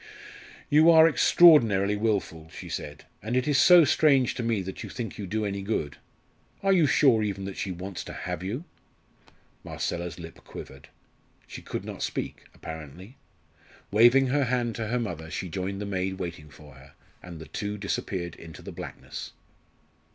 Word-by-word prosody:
"You 155 +3 +5
are 160 -1 +8
extraordinarily 115 - +5
wilful," 100 -7 -2
she - - -10
said. 75 -1 -6 0.2
"And 115 +4 -2
it 130 - 0
is 145 -2 +3
so 175 -3 +8
strange 140 -4 +3
to - - -5
me 115 -4 0
that 95 +1 -7
you - - -7
think 115 -3 -6
you 100 - -5
do 110 +3 -2
any 100 -1 -3
good. 95 -8 -3 0.7
Are 195 0 +4
you 170 -5 +4
sure 130 -6 +4
even 100 -2 -3
that 100 - -6
she 95 - -4
wants 90 +1 -6
to - - -8
have - - -5
you?" 110 - -4 1.0
Marcella's 85 0 -4
lip 80 -1 -10
quivered. 70 0 -11 0.6
She - - -10
could - - -6
not - - -7
speak, - - -4
apparently. 80 - -10 0.7
Waving 120 +6 +6
her 140 +1 +2
hand 120 -2 -1
to 115 -2 -3
her 125 +3 -1
mother, 85 -8 -5
she 90 +2 -5
joined 95 +4 -4
the 105 - -4
maid 95 -1 -2
waiting 85 -5 -6
for 75 -1 -15
her, 70 +1 -17 0.3
and 90 -2 -10
the 80 - -9
two 105 +8 -5
disappeared 95 -3 -3
into 80 -2 -12
the - - -8
blackness. - - -8
100 Hz, 175 wpm, -27 LUFS, 85-125 Hz, 1.0 s, are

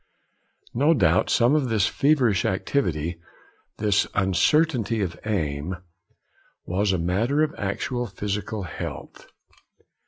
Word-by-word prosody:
No 145 +7 +3
doubt 90 - +3
some 120 +3 +3
of 145 -5 +1
this 110 -4 +2
feverish 130 -8 +2
activity, 85 - -1 0.6
this 105 -1 +2
uncertainty 115 - +2
of 85 -2 -4
aim, 80 -4 -2 0.9
was 95 +3 0
a 95 - +1
matter 110 - +1
of 155 0 -1
actual 120 +5 -2
physical 105 +1 -4
health. 85 - -7
105 Hz, 105 wpm, -24 LUFS, 90-125 Hz, 0.9 s, No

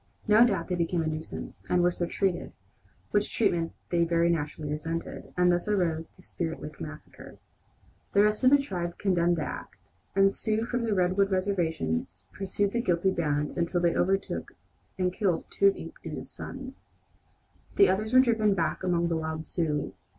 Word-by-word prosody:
No 215 +3 +7
doubt 190 -7 -1
they - - 0
became 170 -1 0
a - - -2
nuisance, 155 0 -6
and 175 -1 +3
were 175 - +4
so 175 0 -2
treated, 190 -1 -1 0.6
which 205 0 +1
treatment 170 -7 +1 0.2
they 170 -1 +3
very 170 0 +2
naturally 150 -2 -3
resented, 165 +2 -4
and 180 0 +5
thus 175 +2 0
arose 170 -6 0
the - - -18
"Spirit - - -4
Lake - - -9
massacre." - - -10 0.8
The 200 - +6
rest 210 +3 +1
of 255 - +7
the 285 - +7
tribe 175 -11 -4
condemned 175 -3 +2
the 155 - -1
act, - - -6 0.4
and 195 0 +5
Sioux 220 +1 -1
from 240 0 -1
the 215 -2 +1
Redwood 185 +2 +2
reservation 175 - 0 0.3
pursued 200 +1 -1
the 235 - 0
guilty 180 -2 +2
band 150 -4 -1
until 170 +1 0
they 175 -1 +2
overtook 195 +2 0 0.4
and 180 -1 0
killed 185 -4 0
two 200 - +4
of 195 - +4
Inkpaduta's - - -8
sons. 265 0 -9 0.9
The 400 - +7
others 215 +3 0
were 255 0 +8
driven 220 -5 +2
back 170 - -1
among 170 -2 +1
the 165 -1 0
wild 160 0 -4
Sioux. 150 -3 -1
180 Hz, 175 wpm, -28 LUFS, 165-205 Hz, 0.9 s, were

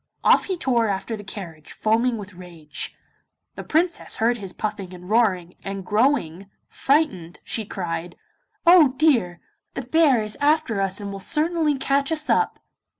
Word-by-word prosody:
Off - - +5
he 375 -2 -3
tore 240 -7 +1
after 195 +3 -3
the 205 - -9
carriage, 175 -6 -9
foaming 230 +2 +1
with 205 -1 -9
rage. 170 -4 -7 0.6
The - - -8
Princess 335 +2 0
heard 235 +2 +1
his 195 -3 -6
puffing 200 -3 -5
and 180 0 -12
roaring, 190 -5 +1
and 195 -1 -5
growing 200 - 0 0.2
frightened 205 - 0
she 220 - -3
cried: 170 -3 -5 0.5
'Oh 335 -6 +6
dear! 235 - +2 0.3
the 270 - -4
bear 270 -3 +3
is 215 0 -7
after 290 -8 +2
us 195 +1 -1
and 200 -1 -6
will 195 - -6
certainly 310 - +1
catch 275 +3 0
us 305 -2 0
up! - - +1
215 Hz, 155 wpm, -23 LUFS, 185-280 Hz, 0.6 s, Oh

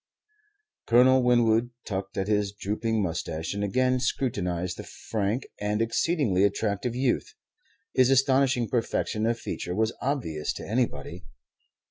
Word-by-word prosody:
Colonel 130 +2 +6
Winwood 120 -1 +3 0.2
tugged 95 0 -4
at 95 0 -1
his 105 -1 +1
drooping 105 +2 -1
moustache 80 -1 -3
and 100 0 -3
again 130 +5 +1
scrutinized 90 -9 -1
the - - -6
frank 110 +3 -3
and 105 +1 -1
exceedingly 115 - +1
attractive 100 +3 0
youth. 130 - 0 0.6
His 130 -1 +4
astonishing 135 -2 +3
perfection 110 -2 -1
of 115 0 +1
feature 90 -5 -4
was 110 +2 +1
obvious 120 - -2
to - - -8
anybody. 90 - -2
110 Hz, 125 wpm, -27 LUFS, 100-125 Hz, 0.6 s, Colonel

